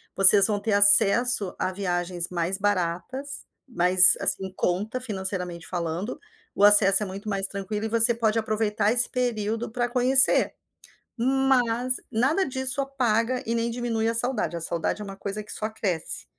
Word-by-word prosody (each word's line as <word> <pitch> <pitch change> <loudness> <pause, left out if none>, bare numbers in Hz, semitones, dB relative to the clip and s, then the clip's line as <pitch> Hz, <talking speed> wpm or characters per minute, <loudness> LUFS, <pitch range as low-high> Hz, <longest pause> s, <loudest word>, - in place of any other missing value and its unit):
vocês 195 +1 +7
vão 210 -1 -2
ter 205 +1 -4
acesso 205 +1 +5
à 185 - -4
viagens 175 -2 -3
mais 180 +1 -3
baratas, 205 +8 -4 0.2
mais 180 -5 +6
assim, 190 - 0
em 190 - -11
conta, 205 +8 -4
financeiramente 190 -6 -3
falando, 170 +5 -6 0.3
o - - -3
acesso 205 -1 +5
é - - -3
muito 195 +2 -11
mais 195 -2 +1
tranquilo 205 +2 -7
e - - -3
você 230 +1 +4
pode 225 -1 -2
aproveitar 215 -1 -2
esse 240 +1 +1
período 225 -2 -4
pra 240 +1 -4
conhecer. 260 +2 +4 0.6
Mas, 255 -1 -1
nada 270 - -1
disso 265 0 -3
apaga 250 -3 -3
e 230 - -4
nem 230 0 -3
diminui 230 -2 -4
a 230 - -2
saudade. 230 -5 -1
A 170 - -7
saudade 170 +5 -4
é - - -7
uma 195 -1 -11
coisa 205 +2 -7
que - - -13
só 215 - -6
cresce. 195 -7 -5
215 Hz, 165 wpm, -23 LUFS, 195-240 Hz, 0.6 s, vocês